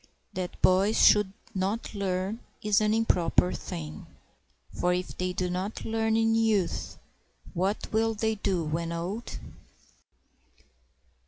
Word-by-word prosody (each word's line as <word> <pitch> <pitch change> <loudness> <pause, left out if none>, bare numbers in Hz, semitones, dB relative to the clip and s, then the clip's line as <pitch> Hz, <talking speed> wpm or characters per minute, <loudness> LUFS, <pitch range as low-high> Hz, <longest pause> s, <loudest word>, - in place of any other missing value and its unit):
That 185 -1 -4
boys 195 +4 +4
should 210 -2 +6 0.2
not 195 +5 -2
learn 195 +1 -2 0.2
is 210 -1 +3
an 210 0 +2
improper 185 -5 +2
thing; 75 -2 -6 0.6
For 180 0 +1
if 180 0 -4
they 180 0 -1
do 180 0 -1
not 185 +4 -3
learn 225 0 +1
in 225 0 +3
youth, 220 -5 +1 0.6
what 190 +3 -1
will 225 0 +2
they 220 +1 0
do 195 -4 -1
when 165 +2 -2
old? 180 +8 -4
195 Hz, 120 wpm, -28 LUFS, 180-220 Hz, 0.6 s, should